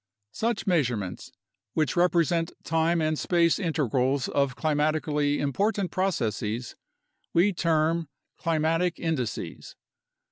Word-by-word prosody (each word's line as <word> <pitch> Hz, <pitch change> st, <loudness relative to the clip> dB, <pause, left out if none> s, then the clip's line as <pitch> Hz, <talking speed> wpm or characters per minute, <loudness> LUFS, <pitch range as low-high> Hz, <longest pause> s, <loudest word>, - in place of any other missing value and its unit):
Such 230 Hz, -1 st, -1 dB
measurements, 120 Hz, -, -1 dB, 0.4 s
which 155 Hz, +3 st, +1 dB
represent 170 Hz, -1 st, +2 dB
time 165 Hz, 0 st, +1 dB
and 155 Hz, -1 st, 0 dB
space 170 Hz, -1 st, +2 dB
integrals 135 Hz, -, 0 dB
of 140 Hz, -2 st, +1 dB
climatically 150 Hz, -1 st, +1 dB
important 195 Hz, -, 0 dB
procesess, 120 Hz, -, -1 dB, 0.6 s
we 190 Hz, +4 st, +4 dB
term 165 Hz, -1 st, +1 dB, 0.3 s
"climatic 165 Hz, +2 st, 0 dB
indices." 150 Hz, -9 st, -3 dB
160 Hz, 95 wpm, -27 LUFS, 140-170 Hz, 0.6 s, we